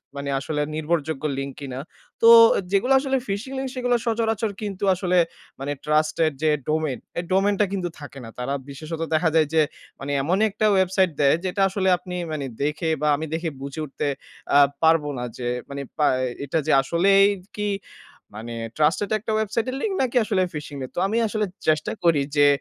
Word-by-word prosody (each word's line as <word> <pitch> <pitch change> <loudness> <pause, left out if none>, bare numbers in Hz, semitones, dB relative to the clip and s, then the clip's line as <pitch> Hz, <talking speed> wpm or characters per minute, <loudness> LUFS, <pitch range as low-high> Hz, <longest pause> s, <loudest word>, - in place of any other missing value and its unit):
মানে 140 0 -4
আসলে 150 +1 -2
নির্ভরযোগ্য 155 -2 -2
লিঙ্ক 135 0 -4
কিনা। 130 -2 -6 0.4
তো 230 - +6 0.4
যেগুলো 225 +7 +3
আসলে 270 -1 0
phishing 205 +7 -4
লিঙ্ক 265 0 -3
সেগুলো 245 -1 +1
সচরাচর 225 -2 0
কিন্তু 200 -2 -5
আসলে 180 0 0 0.4
মানে 140 +1 -3
ট্রাস্টেড 155 +1 +2
যে 155 - +4 0.2
ডোমেইন, 155 -4 0 0.2
এই 175 - -1
ডোমেইন 200 +2 +3
টা - - +5
কিন্তু 180 -3 -2
থাকে 140 -2 -10
না। 115 - -9
তারা 135 +3 -2 0.2
বিশেষত 155 +4 -6
দেখা 160 +1 +3
যায় 155 -2 +4
যে 160 - +5 0.4
মানে 140 +1 -4
এমনই 185 +9 +2
একটা 215 +1 -1
ওয়েবসাইট 190 -1 +3
দেয় 140 +1 +5
যেটা 195 +2 -1
আসলে 190 0 0
আপনি 180 0 -8 0.2
মানে 145 -3 -3 0.2
দেখে 150 +3 -1
বা 150 - +1
আমি 155 - -4
দেখে 165 0 -1
বুঝে 140 +2 -6
উঠতে 145 +1 -4 0.5
আ - - +8 0.3
পারব 160 -1 +5
না 125 - -3
যে 120 - -4 0.2
মানে 140 0 -5 0.2
পা 150 - +3 0.2
এ - - -1 0.2
এটা 160 +4 0
যে - - +3
আসলেই 195 +7 +4 0.3
কি 210 0 -1 0.7
মানে 115 +2 -7 0.2
ট্রাস্টেড 160 +7 +2
একটা 220 +1 -4
ওয়েবসাইটের 220 +4 -1
লিংক 415 -3 -1
নাকি 255 -1 0
আসলে 200 -4 +1
phishing 150 -2 -6
এর। - - -11
তো - - -1
আমি 220 +3 -1
আসলে 215 0 -1 0.2
চেষ্টা 155 -1 +2
করি 165 -4 +4
যে 145 0 +6
165 Hz, 185 wpm, -23 LUFS, 150-200 Hz, 0.7 s, আ